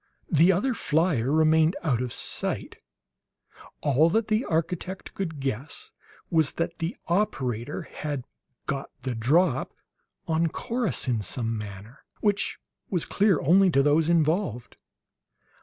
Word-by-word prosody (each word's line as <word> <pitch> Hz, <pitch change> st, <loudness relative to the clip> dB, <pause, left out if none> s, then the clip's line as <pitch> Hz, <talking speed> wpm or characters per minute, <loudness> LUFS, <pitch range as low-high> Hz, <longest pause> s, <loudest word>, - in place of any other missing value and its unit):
The 165 Hz, +3 st, +6 dB
other 205 Hz, +8 st, +1 dB
flier 155 Hz, -, +1 dB
remained 160 Hz, +2 st, +4 dB
out 130 Hz, -7 st, +1 dB
of 125 Hz, -2 st, -3 dB
sight. -, -, -3 dB, 1.0 s
All 150 Hz, +3 st, +4 dB
that 220 Hz, +5 st, +1 dB
the 215 Hz, +3 st, +2 dB
architect 180 Hz, +3 st, -2 dB
could 165 Hz, -6 st, -4 dB
guess 140 Hz, -, -4 dB, 0.4 s
was 160 Hz, -4 st, +3 dB
that 165 Hz, -, -3 dB
the 170 Hz, -, -3 dB
operator 135 Hz, -, -1 dB
had 145 Hz, -4 st, -5 dB, 0.4 s
"got 140 Hz, 0 st, -3 dB
the 130 Hz, -1 st, -2 dB
drop" 135 Hz, +5 st, +2 dB, 0.5 s
on 165 Hz, +1 st, +2 dB
Corrus 230 Hz, -, -2 dB
in 120 Hz, -4 st, +1 dB
some 115 Hz, +3 st, -2 dB
manner 105 Hz, +3 st, -8 dB, 0.2 s
which 205 Hz, -1 st, 0 dB, 0.3 s
was 180 Hz, -4 st, 0 dB
clear 200 Hz, -5 st, +3 dB
only 185 Hz, +6 st, +5 dB
to 140 Hz, -5 st, +3 dB
those 150 Hz, +3 st, +3 dB
involved. 160 Hz, -, +1 dB
160 Hz, 125 wpm, -26 LUFS, 130-185 Hz, 1.0 s, The